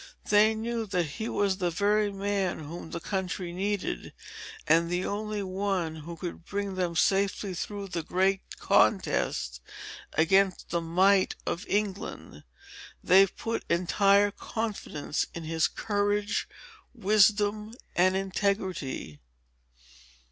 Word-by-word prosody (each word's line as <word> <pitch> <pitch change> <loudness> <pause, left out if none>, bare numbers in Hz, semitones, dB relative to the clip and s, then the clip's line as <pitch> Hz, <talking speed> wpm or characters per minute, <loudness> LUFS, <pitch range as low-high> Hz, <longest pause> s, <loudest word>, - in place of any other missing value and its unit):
They 215 +1 +5
knew 225 0 -3
that 180 -3 +1
he 220 +10 -5
was 195 -2 +1
the 180 -3 0
very 205 +4 +1
man 195 -2 -1
whom 160 +2 -8
the 170 - -4
country 185 -1 -3
needed, 200 +2 -3 0.5
and 170 +1 +4
the 180 +1 -1
only 210 0 -3
one 185 -4 -2
who 165 +2 -8
could 175 0 -6
bring 200 +1 -3
them 180 -2 -2
safely 195 +2 +1
through 200 +2 -5
the 170 -2 -2
great 190 +4 +1 0.2
contest - - +1 0.5
against 190 +4 +2
the 170 0 0
might 185 +4 +3
of 180 +4 -3
England. 205 -1 -3 0.6
They 195 +2 +6
put 230 +4 -4
entire 200 +4 +3
confidence 205 -10 -3
in 170 - -5
his 160 0 +1
courage, 205 -1 -1 0.5
wisdom, 210 0 +3 0.2
and 185 +1 +4
integrity." 190 - -2
195 Hz, 120 wpm, -28 LUFS, 175-205 Hz, 0.6 s, They